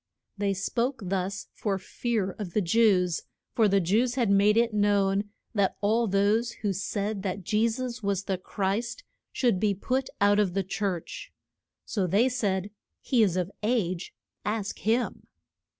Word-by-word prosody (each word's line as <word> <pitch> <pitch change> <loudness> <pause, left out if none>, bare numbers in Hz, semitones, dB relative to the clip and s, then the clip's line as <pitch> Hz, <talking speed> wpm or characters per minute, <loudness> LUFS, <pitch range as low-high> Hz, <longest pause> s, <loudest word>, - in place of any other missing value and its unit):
They 200 -1 0
spoke 235 +7 -1
thus 190 +1 -2
for 200 -3 -1
fear 205 +1 -2
of 185 -5 -5
the 210 - +2
Jews; 180 -3 +3 0.3
for 225 -2 +4
the 200 0 +3
Jews 220 +8 +1
had 235 -6 +2
made 205 +2 +4
it 230 -1 +3
known 205 -1 +2 0.2
that 200 -4 +1
all 225 +3 +2
those 205 +4 +2
who 205 -2 +1
said 200 +1 -2
that 190 0 -3
Je 215 +4 +2
sus 245 +1 -4
was 200 -2 -1
the 190 -2 -2
Christ 205 - -2 0.3
should 235 -8 +1
be 205 -1 +2
put 260 +7 -1
out 205 +1 +4
of 195 -4 +1
the 195 - +1
church. 195 - -4 0.5
So 195 -4 -1
they 210 +9 +3
said, 205 -5 -1 0.3
He 250 -4 +2
is 190 -4 +3
of 180 +1 -1
age; 205 -6 -1 0.3
ask 210 -1 -2
him. 230 +3 0
205 Hz, 160 wpm, -27 LUFS, 195-225 Hz, 0.5 s, for